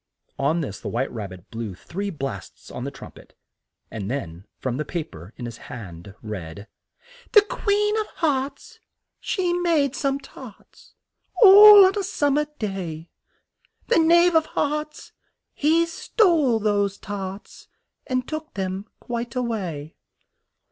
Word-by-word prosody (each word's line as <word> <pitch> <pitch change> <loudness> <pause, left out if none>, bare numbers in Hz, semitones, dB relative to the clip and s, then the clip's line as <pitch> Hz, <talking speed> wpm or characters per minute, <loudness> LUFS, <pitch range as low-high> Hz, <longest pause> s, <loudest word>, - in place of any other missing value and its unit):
On 155 +5 +1
this 105 -10 -5
the - - -8
White 130 +4 -2
Rab 105 -4 -6
bit 90 -1 -14
blew 115 -4 -5
three 200 - -5
blasts 135 - -7
on - - -6
the - - -3
trum - - -11
pet, - - -18 0.6
and 105 -2 -5
then 95 -8 -5
from 130 -1 -3
the 150 - -1
pa 170 +2 -3
per 85 - -13
in 120 - -6
his 115 -1 -7
hand 95 -4 -9
read: 100 -2 -7 0.7
"The 420 -3 +8
Queen 420 -2 0
of 430 - -2
Hearts, 280 -3 -2 0.4
she 360 -4 -1
made 325 -6 +1
some 275 -1 -1
tarts, 260 -5 -15 0.5
All 410 0 +10
on 375 - +2
a - - 0
sum 290 -7 0
mer 300 +1 +1
day: 175 -6 -5 0.8
The 470 - +4
Knave 340 +2 +5
of 320 -1 +3
Hearts, 300 +1 -3 0.4
he 325 +3 +2
stole 330 - +2
those 205 -2 0
tarts, 195 0 -8 0.4
And 255 -1 -1
took 310 0 -6
them 190 +1 -4
quite 235 0 -5
a 250 - 0
way!" 175 -10 -4
215 Hz, 150 wpm, -23 LUFS, -, 0.8 s, All